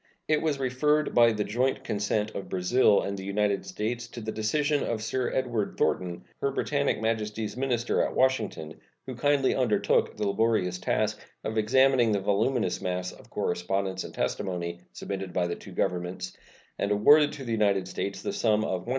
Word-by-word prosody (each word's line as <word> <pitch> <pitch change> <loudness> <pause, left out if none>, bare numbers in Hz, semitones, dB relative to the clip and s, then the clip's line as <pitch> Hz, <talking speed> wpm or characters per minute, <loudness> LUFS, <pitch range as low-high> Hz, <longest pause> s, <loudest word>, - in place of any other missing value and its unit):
It 155 -1 +2
was 155 -3 0
referred, 145 +4 +1
by 120 -1 +6
the 105 -1 -1
joint 125 +6 0
consent 105 +1 -1
of 100 - -6
Brazil 100 +4 +3
and 100 - -3
the 95 - -7
United 100 0 0
States, 120 +2 -3
to 120 - -9
the 110 -1 -4
decision 145 +7 0
of 110 -2 -2
Sir 130 +3 -1
Edward 120 -5 -1
Thornton, 90 -2 0 0.2
Her 140 - +2
Britannic 140 -1 0
Majesty's 110 -1 -2
minister 125 -2 0
at - - -1
Washington, 130 - 0 0.3
who 130 - -5
kindly 135 +2 +2
undertook 105 -7 +1
the 105 -1 -1
laborious 100 -3 +1
task 105 +2 0 0.2
of 110 - -3
examining 130 +1 +4
the 100 - +1
voluminous 110 +5 0
mass 90 -1 -2
of - - -16
correspondence 95 +2 -2
and - - -8
testimony 85 -2 -2
submitted 95 -2 -5
by 90 - +1
the 85 - -2
two - - -12
Governments, 90 +1 -2 0.4
and 100 - 0
awarded 145 +9 +5
to 145 -2 -7
the 120 - -5
United 100 -4 +2
States 100 +1 -4
the - - -2
sum 110 -2 +2
of 95 -4 -2
$100,740. - - -7
110 Hz, 175 wpm, -27 LUFS, 100-130 Hz, 0.4 s, by